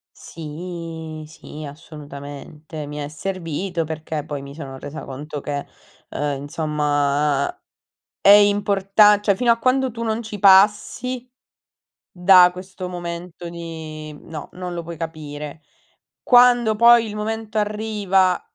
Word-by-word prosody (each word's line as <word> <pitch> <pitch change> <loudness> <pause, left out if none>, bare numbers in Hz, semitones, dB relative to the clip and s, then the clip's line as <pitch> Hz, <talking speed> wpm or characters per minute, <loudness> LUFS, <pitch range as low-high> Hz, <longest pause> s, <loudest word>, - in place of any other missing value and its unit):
Sì, 160 0 -7
sì, 155 -1 -11
assolutamente. 150 +1 -9
Mi 150 - -7
è 145 -1 -4
servito, 170 +2 -3
perché 155 -1 -5
poi 145 -2 -5
mi 140 0 -10
sono 135 -4 -8
resa 145 +2 -7
conto 145 +2 -7
che, 145 0 -4 0.4
uhm, 145 -1 -3
insomma 145 -1 0 0.6
è 200 - +5
importan 205 0 +5
cioè 200 - +3
fino 240 +4 0
a 230 - +3
quando 260 +1 +2
tu 230 +1 -5
non 220 0 -1
ci 215 -2 -7
passi 210 +6 +4 0.8
da 180 0 +6
questo 185 0 -8
momento 175 0 -6
di 160 -2 -8
no, 155 -2 -8
non 180 -1 -6
lo 170 - -4
puoi 170 0 -8
capire. 150 -2 -7 0.6
Quando 245 -3 +5
poi 235 0 +6
il 210 - -6
momento 220 0 -3
arriva 205 -3 +1
170 Hz, 125 wpm, -21 LUFS, 150-205 Hz, 0.8 s, da